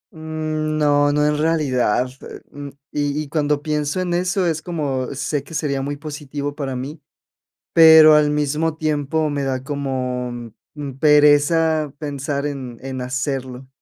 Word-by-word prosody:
Mm, 155 -1 -3
no, 145 -1 +3
no, 150 0 +2
en 150 0 +1
realidad, 130 -7 +1
eh, - - -10
mm, 145 0 -8 0.2
y 145 0 -1
y - - -10
cuando 150 -1 0
pienso 150 +2 -1
en 180 -1 -1
eso, 180 +1 0
es 160 -2 -1
como, 140 -7 -3
sé 140 0 -2
que 165 - -10
sería 140 -3 -1
muy 145 +1 -4
positivo 145 -1 -5
para 135 -3 -4
mí, 145 +5 -6 0.7
pero 160 -1 +9
al 150 -1 +4
mismo 150 +2 0
tiempo, 155 0 -1
me 145 -1 -2
da 130 -1 -2
como, 125 -4 -4 0.2
mm, 145 -2 -5
pereza 150 +1 +4
pensar 140 -1 -3
en 130 -5 -5
en 130 -1 -5
hacerlo. 130 0 -4
145 Hz, 150 wpm, -20 LUFS, 135-155 Hz, 0.7 s, pero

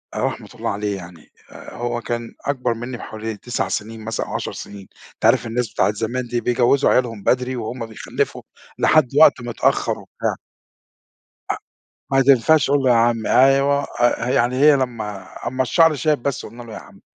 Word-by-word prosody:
رحمة - - -3
الله - - -3
عليه 100 -1 -2
يعني 85 -3 -13 0.2
آآ - - -11
هو 120 0 -3
كان 120 +1 -4
أكبر 125 -4 0
مني 120 +2 -6
بحوالي 110 0 -6
9 120 +2 -3
سنين 110 +1 -5
مثلًا 115 - -2
أو - - -7
10 - - -3
سنين 100 -2 -9 0.3
أنت - - -5
عارف 120 +2 +4
الناس 115 -1 -2
بتاعة 105 - +2
زمان 120 +3 -3
دي 120 0 -2
بيجوزوا 125 +4 +2
عيالهم 115 -5 +1
بدري 125 0 +1
وهم 115 +1 -5
بيخلفوا 110 -1 -3 0.4
لحد 155 -6 +4
وقت 130 - +6
متأخر 120 -1 0
وبتاع. - - -4 1.2
أ - - +2 0.6
ما 135 0 +5
تنفعش 135 +3 +4
أقول 145 -1 +3
له 130 - +3
يا - - +6
عمي 115 -1 +2
أيوه، 135 +2 +4 0.2
أ 120 0 +2
يعني 125 0 +1
هي 150 +2 +6
لما 110 -7 -4 0.2
أمّا 130 +1 -1
الشعر 165 +4 +4
شاب 150 -3 0
بس 140 -2 -2
قلنا 120 +3 -11
له 115 -2 -11
يا - - -6
عمي. - - -16
120 Hz, 180 wpm, -21 LUFS, 115-130 Hz, 1.2 s, وقت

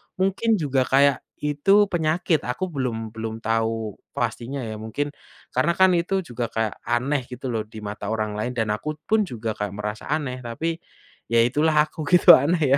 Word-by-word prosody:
mungkin 195 +4 0
juga 135 -7 0
kayak 140 0 +4 0.2
itu 195 +8 +3
penyakit 165 -1 +1
aku 155 +10 -2
belum 125 -7 -3
belum 110 0 -5
tahu 115 -1 -1 0.2
pastinya 135 +4 -3
ya 110 -3 -5
mungkin, 110 +7 -3 0.5
karena 170 - +3
kan 190 0 +7
itu 190 +3 0
juga 120 -8 -4
kayak 110 -1 -1
aneh 130 +4 +1
gitu 125 +1 -5
loh 110 -2 -1
di 110 0 -11
mata 105 0 -6
orang 110 -1 -2
lain, 120 +4 -2
dan 110 -3 -1
aku 105 +9 -2 0.2
pun 220 -1 +3
juga 115 - -5
kayak 105 -2 -3
merasa 105 +1 -5
aneh 135 -5 -2
tapi, 160 +8 -2 0.5
ya 115 - +4
itulah 150 +7 +2 0.2
aku 155 - -6
gitu 180 +4 +8
aneh 145 -3 +2
130 Hz, 175 wpm, -24 LUFS, 110-155 Hz, 0.5 s, gitu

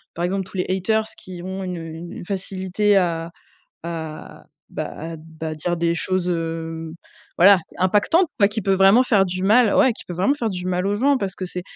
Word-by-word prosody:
par 170 - -1
exemple, 190 +1 -1
tous 190 - -8
les 180 - 0
haters 205 +4 +1 0.2
qui 180 -2 -9
ont 190 +1 -5
une, 180 -1 -4
heu, 165 - -7 0.3
une - - -8
facilité 195 +1 0
à 170 -3 0 0.5
à, 160 -2 -7 0.3
bah - - -4
à, 165 +1 -6
bah, 160 0 -8
à 155 - -4
dire 175 +3 -2
des 170 0 +1
choses, 185 +1 -1
hem, 165 -1 -4 0.4
voilà, 195 +2 +7 0.2
impactantes, 210 - +3
quoi, 200 - +6
qui 215 +2 -3
peut 195 - +1
vraiment 195 +6 +6
faire 210 -6 +3
du 185 0 -4
mal 220 +3 +4
ouais, 260 - +5
qui - - -11
peuvent 175 - -7
vraiment 190 +10 +2
faire 240 -6 -2
du 180 -2 -5
mal 180 +1 0
aux 200 - +1
gens 275 +4 +3
parce 195 -3 -3
que 185 - -5
c'est 180 0 -5
185 Hz, 215 wpm, -22 LUFS, 170-200 Hz, 0.5 s, voilà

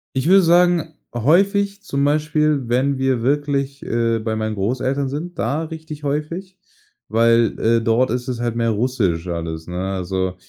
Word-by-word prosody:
ich 130 +4 0
würde 195 +1 +7
sagen, 170 -2 +3 0.2
häufig 200 - +2
zum 140 -6 -1
Beispiel, 150 -1 +1
wenn 130 +3 +1
wir 130 -3 0
wirklich, 140 +1 -1
äh, 115 -1 0
bei 110 0 -2
meinen 110 0 -2
Großeltern 130 +6 -1
sind, 170 +6 -5
da 140 +8 -1
richtig 160 -2 -8
häufig, 165 +7 -3 0.5
weil, 115 +1 +3
äh, 115 0 +2
dort 115 +2 +2
ist 125 +1 -2
es 125 -2 -3
halt 120 -1 -2
mehr 115 -1 +1
Russisch 100 -7 0
alles, 80 -1 -4
ne? 95 +2 -3
Also, 95 0 -2
130 Hz, 160 wpm, -20 LUFS, 115-150 Hz, 0.5 s, würde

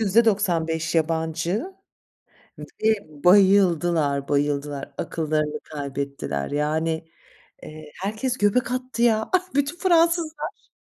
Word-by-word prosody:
%95 185 -7 +1
yabancı 165 - -1 1.1
ve 220 0 +4 0.3
bayıldılar, 175 -7 +4
bayıldılar! 145 0 -1
Akıllarını 155 -2 -2
kaybettiler. 140 - -4
Yani, 160 +2 -1 0.5
eee, 155 -1 -11
herkes 220 +6 -2
göbek 220 +4 +1
attı 255 -1 -3
ya, 220 -2 +2
ah, 370 -2 +1
bütün 285 +4 0
Fransızlar 335 -4 +2
ş - - -34
170 Hz, 95 wpm, -23 LUFS, 150-230 Hz, 1.1 s, ve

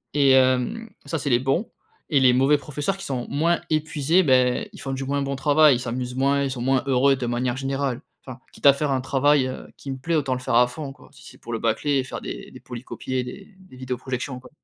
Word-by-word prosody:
et 140 -2 +5
hem, 130 - +2 0.2
ça, 165 - -3
c'est 140 - -2
les 120 -2 +4
bons 135 - 0 0.4
et 145 - +3
les 130 -2 +5
mauvais 135 +4 +4
professeurs 150 +7 -3
qui 195 - -8
sont 125 -3 -3
moins 165 +4 +1
épuisés, 155 +2 +2
beh, 130 - +2
ils 200 - -12
font 135 -1 -4
du 135 0 -3
moins 140 +1 -1
bon 140 0 -2
travail. 145 +1 +5
Ils - - -7
s'amusent 125 +1 -4
moins, 140 +1 +2
ils 135 - -1
sont 125 -2 -5
moins 130 +1 +1
heureux 135 +1 +4
de 130 - -4
manière 120 +1 -1
générale. 135 -1 -2 0.2
Enfin, 130 -1 -9
quitte - - -12
à 140 - +9
faire 145 +1 -2
un 130 -1 0
travail, 135 +1 +2
heu, 130 - -7
qui 140 - -9
me 135 - -4
plaît, 160 +5 -2
autant 135 -4 0
le - - -5
faire 125 - -3
à 125 +1 +6
fond, 135 +3 -7
quoi, - - -19
si - - -17
c'est - - -13
pour - - -9
le - - 0
bâcler 115 +6 0
et - - 0
faire 130 - -7
des - - -7
des - - -12
polycopiés, 125 +1 -5
des 190 +11 -10
des 185 -8 -17
vidéo-projections, 130 +1 -4
quoi. 125 - -15
135 Hz, 250 wpm, -23 LUFS, 125-145 Hz, 0.4 s, à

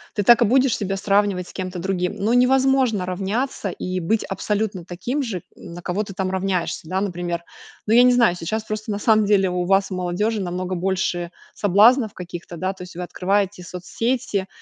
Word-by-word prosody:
ты 205 - 0
так 240 +4 +6
и 235 - +6
будешь 260 +2 +3
себя 195 -1 -2
сравнивать 200 -2 +1
с - - -13
кем-то 185 -1 -5
другим. 180 0 -1
Ну 220 +4 0
невозможно 255 -4 +3
равняться, 195 +5 -2
и 185 +1 -4
быть 210 +6 0
абсолютно 205 -2 -2
таким 240 - -3
же, 205 -9 -4
м, 170 - -11
на 175 - -8
кого 190 +4 -1
ты 200 - -9
там 190 0 -2
равняешься, 185 -4 -2
да. 190 +1 0
Например, 175 -3 -3 0.4
ну 215 - +1
я 240 - +8
не 250 - +6
знаю, 235 -7 +4
сейчас 215 +6 -3
просто, 215 0 -4
на 200 - -1
самом 215 -1 +4
деле, 195 -2 +3
у 180 0 -1
вас, 195 +1 +2
у 185 - -2
молодежи, 200 +5 -1
намного 185 0 -3
больше 175 -1 -1 0.2
соблазнов 215 +4 +4
каких-то, 175 -1 -8
да. 185 +3 -2
То 190 - -14
есть 180 -1 -11
вы 180 - -4
открываете 190 +1 -1
соцсети, 200 +3 -2
195 Hz, 195 wpm, -22 LUFS, 180-215 Hz, 0.4 s, я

